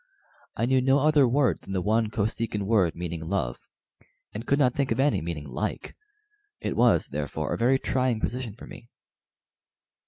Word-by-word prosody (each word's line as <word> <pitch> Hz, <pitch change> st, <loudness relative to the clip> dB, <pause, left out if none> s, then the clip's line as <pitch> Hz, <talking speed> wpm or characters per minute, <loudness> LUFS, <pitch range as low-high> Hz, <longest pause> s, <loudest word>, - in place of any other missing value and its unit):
I 115 Hz, -, 0 dB
knew 130 Hz, +1 st, +3 dB
no 135 Hz, +2 st, +4 dB
other 145 Hz, -2 st, +4 dB
word 130 Hz, +1 st, +1 dB
than 95 Hz, -, -8 dB
the 95 Hz, -, 0 dB
one 110 Hz, +1 st, +1 dB
Kosekin 105 Hz, 0 st, -2 dB
word 95 Hz, -6 st, +2 dB
meaning 85 Hz, -2 st, -5 dB
"love," 70 Hz, -12 st, -2 dB, 0.7 s
and 110 Hz, +3 st, -7 dB
could 140 Hz, -, +3 dB
not 130 Hz, -4 st, +3 dB
think 140 Hz, -2 st, -1 dB
of 115 Hz, -, 0 dB
any 145 Hz, +1 st, +2 dB
meaning 80 Hz, -3 st, -5 dB
"like." 65 Hz, -, -4 dB, 0.6 s
It -, -, -3 dB
was, 120 Hz, 0 st, +3 dB
therefore, 70 Hz, -1 st, -3 dB
a -, -, -2 dB
very 125 Hz, +3 st, +4 dB
trying 130 Hz, -3 st, 0 dB
position 120 Hz, -2 st, -3 dB
for -, -, -11 dB
me. 120 Hz, -, -12 dB
115 Hz, 175 wpm, -26 LUFS, 95-130 Hz, 0.7 s, no